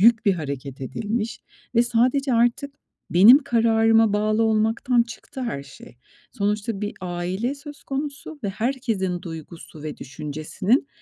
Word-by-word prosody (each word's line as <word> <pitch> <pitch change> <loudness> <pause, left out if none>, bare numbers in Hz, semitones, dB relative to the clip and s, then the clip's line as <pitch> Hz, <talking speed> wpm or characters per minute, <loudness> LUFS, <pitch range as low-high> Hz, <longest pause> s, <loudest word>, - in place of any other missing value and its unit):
büyük 230 +1 +5
bir 200 - +6
hareket 140 -4 -6
edilmiş 215 - -3 0.3
ve 235 - +5
sadece 250 +3 +2
artık 240 +5 +1 0.4
benim 210 +10 +9
kararıma 225 -2 +3
bağlı 215 +2 +2
olmaktan 225 +2 +2
çıktı 235 +2 -9
her 140 - -3
şey. 135 -3 -14 0.4
Sonuçta 210 -1 -1
bir 210 0 -3
aile 185 +8 -2
söz 290 +1 -11
konusu 285 +2 -5
ve 200 - 0
herkesin 215 -5 -2
duygusu 160 -1 -9
ve 155 -1 -5
düşüncesinin 155 - -1
220 Hz, 130 wpm, -23 LUFS, 180-240 Hz, 0.4 s, benim